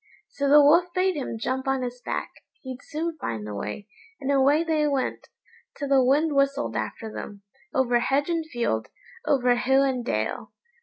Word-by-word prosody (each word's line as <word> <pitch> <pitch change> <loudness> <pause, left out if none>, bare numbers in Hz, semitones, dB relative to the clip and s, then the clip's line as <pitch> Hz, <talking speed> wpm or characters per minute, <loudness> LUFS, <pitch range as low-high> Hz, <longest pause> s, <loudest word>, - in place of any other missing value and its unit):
So 280 0 -1
the 295 +1 +8
Wolf 305 +5 +6
bade 370 0 +2
him 265 -5 -4
jump 260 +4 -3
on 270 -1 0
his 245 0 -5
back, - - -3 0.3
he'd 260 -1 -7
soon 320 +1 -4
find 110 - -4
the 105 - -6
way; 105 - -5 0.3
and 275 +1 -2
away 280 +3 +4
they 310 -2 +1
went, 275 -3 -2 0.5
till 285 -2 -4
the 270 -2 +5
wind 295 +5 +3
whistled 275 +1 +1
after 220 -1 -4
them, 200 -1 -8 0.3
over 245 -2 +2
hedge 275 +4 +1
and 335 -2 0
field, 235 - -1 0.4
over 250 -4 +3
hill 265 +3 +3
and 260 -3 0
dale. 110 - -3
270 Hz, 175 wpm, -25 LUFS, 245-295 Hz, 0.5 s, the